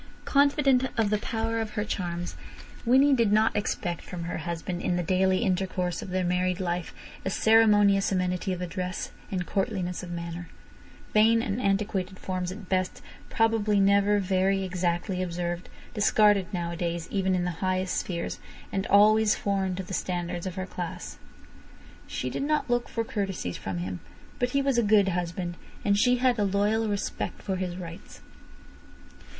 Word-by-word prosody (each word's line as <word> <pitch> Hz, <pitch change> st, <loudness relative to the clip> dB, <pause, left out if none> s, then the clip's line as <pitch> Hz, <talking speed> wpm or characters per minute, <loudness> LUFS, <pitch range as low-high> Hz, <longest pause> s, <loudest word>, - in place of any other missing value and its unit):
Confident 280 Hz, -2 st, +3 dB
of 215 Hz, -2 st, +2 dB
the 210 Hz, -, +2 dB
power 225 Hz, 0 st, -2 dB
of 215 Hz, -1 st, -5 dB
her 210 Hz, -, -1 dB
charms, 175 Hz, -4 st, -3 dB, 0.5 s
Winnie 270 Hz, +4 st, +6 dB
did 230 Hz, -5 st, +3 dB
not 215 Hz, +1 st, +3 dB
expect 180 Hz, -4 st, -2 dB
from 175 Hz, -2 st, -6 dB
her 170 Hz, 0 st, -4 dB
husband 170 Hz, +2 st, -4 dB
in 180 Hz, -, 0 dB
the 175 Hz, -, 0 dB
daily 190 Hz, +3 st, +2 dB
intercourse 185 Hz, -3 st, -1 dB
of -, -, -7 dB
their 185 Hz, 0 st, 0 dB
married 180 Hz, +1 st, 0 dB
life 175 Hz, -2 st, -2 dB, 0.3 s
a -, -, -1 dB
ceremonious 205 Hz, -2 st, +4 dB
amenity 180 Hz, 0 st, 0 dB
of 180 Hz, -1 st, -3 dB
address 180 Hz, +1 st, -4 dB, 0.2 s
and 180 Hz, -2 st, -2 dB
courtliness 190 Hz, -2 st, -2 dB
of 180 Hz, -, -8 dB
manner; 170 Hz, 0 st, -5 dB, 0.6 s
vain 225 Hz, +2 st, +5 dB
and 210 Hz, +4 st, -2 dB
antiquated 195 Hz, -2 st, 0 dB
forms 185 Hz, -1 st, -3 dB
at 195 Hz, 0 st, -9 dB
best, 185 Hz, -1 st, -1 dB, 0.3 s
probably 225 Hz, -2 st, +2 dB
never 200 Hz, +1 st, +4 dB
very 195 Hz, 0 st, +1 dB
exactly 180 Hz, +1 st, -1 dB
observed, 175 Hz, 0 st, -3 dB, 0.2 s
discarded 210 Hz, -2 st, +3 dB
nowadays 170 Hz, -2 st, -3 dB
even 190 Hz, -2 st, +1 dB
in 180 Hz, -, 0 dB
the 180 Hz, -, -1 dB
highest 185 Hz, -1 st, 0 dB
spheres, 170 Hz, -2 st, -3 dB, 0.3 s
and 195 Hz, 0 st, -2 dB
always 215 Hz, +1 st, +5 dB
foreign 195 Hz, -2 st, -1 dB
to 190 Hz, -, -4 dB
the 190 Hz, -, -8 dB
standards 175 Hz, -1 st, -2 dB
of 185 Hz, -, -5 dB
her 185 Hz, -1 st, -3 dB
class. 80 Hz, -, -6 dB, 0.9 s
She 125 Hz, -, -3 dB
did -, -, -3 dB
not 300 Hz, +2 st, +1 dB
look 240 Hz, -1 st, 0 dB
for 230 Hz, -, -1 dB
courtesies 195 Hz, -, -3 dB
from 95 Hz, -2 st, -4 dB
him. 90 Hz, +1 st, -4 dB, 0.4 s
But 245 Hz, -, +1 dB
he 275 Hz, +2 st, +1 dB
was 270 Hz, -3 st, +2 dB
a -, -, +4 dB
good 205 Hz, -2 st, +4 dB
husband, 175 Hz, 0 st, -3 dB, 0.3 s
and 200 Hz, -1 st, +4 dB
she 245 Hz, +4 st, +4 dB
had 250 Hz, -2 st, +2 dB
a -, -, +3 dB
loyal 205 Hz, +3 st, +1 dB
respect 205 Hz, -1 st, -3 dB
for 190 Hz, -1 st, -2 dB
his 180 Hz, -1 st, -3 dB
rights. 170 Hz, -2 st, -9 dB
190 Hz, 165 wpm, -27 LUFS, 180-210 Hz, 0.9 s, Winnie